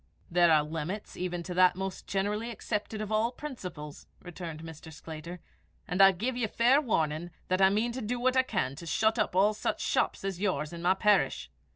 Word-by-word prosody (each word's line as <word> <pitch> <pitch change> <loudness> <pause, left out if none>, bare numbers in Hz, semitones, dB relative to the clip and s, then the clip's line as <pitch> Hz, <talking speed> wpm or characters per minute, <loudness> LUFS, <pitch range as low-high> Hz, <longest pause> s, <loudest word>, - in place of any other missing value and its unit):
"There 175 0 +5
are 155 -1 +5
limits 160 +6 -5
even 175 -1 -3
to 180 - -5
that 185 0 +5
most 190 0 -5
generally 210 +4 -1
accepted 215 -1 -4
of 215 0 -5
all 220 +2 +2
principles," 180 - -8
returned 170 -3 -8
Mr. 160 0 -10
Sclater; 160 +3 -8 0.5
"and 180 +2 +1
I 195 0 +9
give 230 +8 -2
you 240 -2 0
fair 245 +7 +4
warning 165 - -1 0.2
that 185 +1 +1
I 190 - +7
mean 215 +4 +1
to 255 +2 -5
do 240 +3 -2
what 255 +1 +2
I 260 - +6
can 190 - -2
to 170 - -9
shut 220 +7 +2
up 210 - 0
all 200 +3 +4
such 210 - -2
houses - - 0
as 195 -2 -3
yours 155 -6 -1
in 170 - -7
my 180 +2 +3
parish. 135 - +2
190 Hz, 205 wpm, -29 LUFS, 165-215 Hz, 0.5 s, I